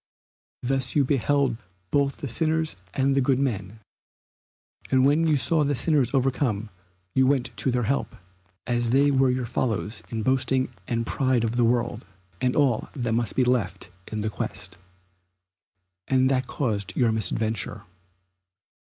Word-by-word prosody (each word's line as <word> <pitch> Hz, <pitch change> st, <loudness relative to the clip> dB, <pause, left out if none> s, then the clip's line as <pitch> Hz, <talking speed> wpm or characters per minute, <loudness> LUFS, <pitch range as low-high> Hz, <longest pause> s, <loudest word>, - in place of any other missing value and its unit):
Thus 130 Hz, 0 st, -1 dB
you 145 Hz, -2 st, +4 dB
beheld 135 Hz, -1 st, +1 dB, 0.3 s
both 140 Hz, -1 st, +1 dB
the 145 Hz, -, -5 dB
sinners 160 Hz, +4 st, 0 dB, 0.2 s
and 135 Hz, 0 st, +2 dB
the 135 Hz, -, +3 dB
good 130 Hz, 0 st, +2 dB
men, 110 Hz, -6 st, -3 dB, 1.1 s
and 130 Hz, 0 st, +4 dB
when 155 Hz, +4 st, +3 dB
you 155 Hz, -, +3 dB
saw 150 Hz, +4 st, +2 dB
the 145 Hz, 0 st, 0 dB
sinners 140 Hz, -3 st, +2 dB
overcome 125 Hz, -5 st, 0 dB, 0.4 s
you 130 Hz, 0 st, +3 dB
went 135 Hz, -2 st, 0 dB
to -, -, +1 dB
their 125 Hz, -1 st, 0 dB
help, 135 Hz, +6 st, -1 dB, 0.5 s
as 120 Hz, -1 st, 0 dB
they 140 Hz, +3 st, +4 dB
were 135 Hz, -1 st, +3 dB
your 125 Hz, 0 st, -1 dB
fellows 115 Hz, -2 st, -2 dB
in 110 Hz, -2 st, -3 dB
boasting 130 Hz, 0 st, +1 dB, 0.2 s
and 115 Hz, -1 st, -1 dB
pride 130 Hz, -3 st, +1 dB
of 115 Hz, +1 st, -1 dB
the 120 Hz, -, +2 dB
world, 120 Hz, 0 st, 0 dB, 0.4 s
and 125 Hz, -1 st, +1 dB
all 135 Hz, -7 st, +2 dB
that 120 Hz, -4 st, -1 dB
must 115 Hz, -2 st, -1 dB
be 130 Hz, -, +3 dB
left 100 Hz, -7 st, -1 dB, 0.2 s
in 110 Hz, -1 st, -2 dB
that 110 Hz, +1 st, -2 dB
quest. -, -, -5 dB, 1.3 s
And 130 Hz, 0 st, +3 dB
that 130 Hz, -1 st, 0 dB
caused 105 Hz, -8 st, -2 dB
your 120 Hz, -3 st, +3 dB
misadventure. 110 Hz, -1 st, 0 dB
125 Hz, 155 wpm, -25 LUFS, 115-135 Hz, 1.3 s, you